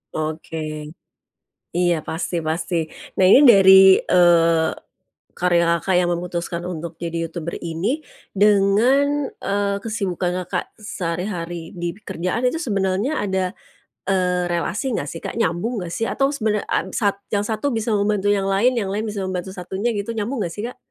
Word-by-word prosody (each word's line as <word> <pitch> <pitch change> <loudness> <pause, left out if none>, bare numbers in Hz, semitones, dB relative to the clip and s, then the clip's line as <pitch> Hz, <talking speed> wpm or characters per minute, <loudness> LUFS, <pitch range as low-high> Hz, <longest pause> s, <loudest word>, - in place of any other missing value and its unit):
Oke, 155 +1 -4 1.2
iya 175 -1 +3
pasti 170 +2 -3
pasti. 160 +2 -2 0.4
Nah, 190 - +6
ini 200 - +8
dari, 190 -5 +8
eee, 170 -2 +4 0.7
karya 175 -1 +3 0.2
Kakak 190 - 0
yang 175 -1 +2
memutuskan 170 0 -3
untuk 170 -1 -6
jadi 170 -1 -4
youtuber 165 0 -5
ini 195 - -3 0.3
dengan, 225 +9 +3
eee, 200 0 0
kesibukan 185 -4 -2
Kakak - - -2
sehari-hari 175 -4 -4
di 175 -1 -4
pekerjaan 195 +2 -3
itu 250 +6 +1
sebenarnya 205 - 0
ada, 190 -2 -1 0.5
eee, 180 -2 +1
relasi 200 +8 -1
nggak 140 - -3
sih 165 - -8
Kak, - - -6
nyambung 225 +4 -1
nggak 170 -1 -6
sih? 225 - -1
Atau 275 +1 +1
sebena 215 -6 -1
ap 190 - -1
sat 200 -2 0
yang 205 -1 0
satu 225 +6 -1
bisa 225 -3 -1
membantu 205 0 +1
yang 195 -1 0
lain, 220 +7 +3
yang 220 -6 -2
lain 210 +3 -2
bisa 210 -2 -4
membantu 185 0 -4
satunya 190 +5 -3
gitu 205 +2 -4
nyambung 225 +3 -2
nggak 170 -4 -3
sih, 210 +2 -4
Kak? 250 - -7
190 Hz, 155 wpm, -21 LUFS, 175-215 Hz, 1.2 s, ini